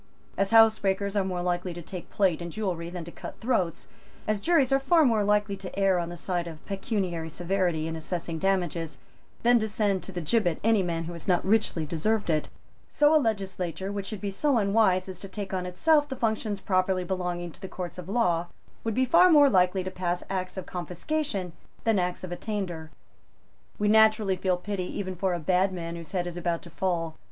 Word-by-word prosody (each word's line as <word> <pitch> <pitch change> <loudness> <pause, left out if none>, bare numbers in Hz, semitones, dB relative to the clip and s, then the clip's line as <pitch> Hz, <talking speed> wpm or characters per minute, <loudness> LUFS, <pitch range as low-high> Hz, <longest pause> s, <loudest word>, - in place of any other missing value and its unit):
As 195 0 +1
housebreakers 205 -3 +4
are 200 - +2
more 180 -2 -3
likely 175 0 -1
to 175 - -6
take 180 +1 -8
plate 185 -5 +1
and 170 0 -5
jewellery 175 -4 -3
than 175 -1 -6
to 170 - -9
cut - - -8
throats; 205 -9 -1 0.4
as 215 -1 0
juries 300 -4 +3
are 270 - +4
far 315 +3 +4
more 225 -5 +3
likely 205 0 +2
to 190 -1 -8
err 195 -2 +3
on 170 -1 -3
the 175 - -7
side 175 0 -2
of 160 -2 -10
pecuniary 190 -5 -2
severity 175 -1 -1
in 165 - -4
assessing 165 0 -4
damages 175 -4 -1 0.5
than 240 0 +5
to 220 - -1
send 205 -3 0
to - - -7
the 180 - -4
gibbet 175 0 +1
any 220 -2 +4
man 170 -2 -2
who 170 +1 -6
has 170 +2 -9
not 180 -2 +2
richly 195 -6 +2
deserved 175 +5 0
it; 155 -1 0 0.4
so 295 0 +4
a 310 - +5
legislature, 190 - -2
which 200 -1 -4
should 210 -2 -6
be 200 -1 -2
so 275 +6 +1
unwise 200 -3 +3
as 185 -2 -7
to 195 - -7
take 195 0 -6
on 180 -1 -2
itself 295 - +3
the 265 - -3
functions 220 -3 -1
properly 185 -1 +1
belonging 175 -1 -3
to 185 - -16
the 190 - -5
Courts 180 0 -6
of 180 0 -8
Law, 175 -6 +1 0.4
would 225 -2 -2
be 260 - +3
far 340 +8 +6
more 290 -4 +7
likely 185 -1 +3
to 185 - -4
pass 180 -1 -2
Acts 185 0 -3
of 185 - -4
Confiscation 185 - -3 0.3
than 225 -3 +3
Acts 180 0 -2
of 185 - -6
Attainder. 175 -5 -4 0.9
We 210 - 0
naturally 215 -2 +5
feel 185 0 0
pity 190 0 -3
even 185 -2 -3
for 185 0 0
a - - -3
bad 185 +4 +2
man 170 -2 -5
whose 165 -2 -8
head 180 -2 -1
is 175 0 -5
about 170 -1 -2
to 170 - -12
fall. 165 -3 -1
190 Hz, 210 wpm, -27 LUFS, 175-210 Hz, 0.9 s, more